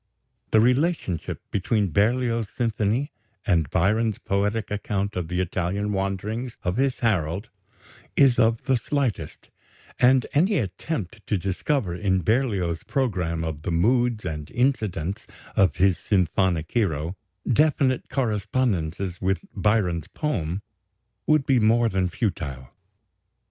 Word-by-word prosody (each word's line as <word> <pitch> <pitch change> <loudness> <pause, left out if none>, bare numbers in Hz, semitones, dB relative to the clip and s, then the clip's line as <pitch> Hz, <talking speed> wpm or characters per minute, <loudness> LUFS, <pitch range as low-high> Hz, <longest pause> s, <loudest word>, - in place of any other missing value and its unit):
The 110 - +5
relationship 125 - +1
between 100 -1 0
Berlioz's 115 +3 +1
symphony 115 +3 0 0.3
and 85 - +2
Byron's 105 +5 +1
poetic 105 +2 -1
account 100 0 -2
of 90 -3 -2
the 90 +2 -2
Italian 95 +3 -1
wanderings 105 +5 -3
of 90 +4 -1
his 135 0 0
Harold 100 -2 0 0.7
is 135 -4 +5
of 115 +1 +3
the 130 -1 +2
slightest, 120 - -3 0.5
and 130 0 +5
any 185 +7 +3
attempt 110 - -3
to 105 - +1
discover, 95 - -1
in 95 0 0
Berlioz's 100 - 0
programme 90 -11 -1
of 80 -2 -4
the 85 - -4
moods 115 +5 +2
and 75 -2 -4
incidents 110 - -1 0.3
of 95 -4 +3
his 95 -1 +3
symphonic 90 -3 +1
hero, 85 -6 0 0.3
definite 130 -1 +2
correspondences 100 - -1
with 95 +1 0
Byron's 95 -6 +1
poem, 95 - -2 0.6
would 155 -3 +3
be 135 -4 +3
more 115 +1 +4
than 95 -2 0
futile. 70 - -3
105 Hz, 120 wpm, -25 LUFS, 90-120 Hz, 0.7 s, The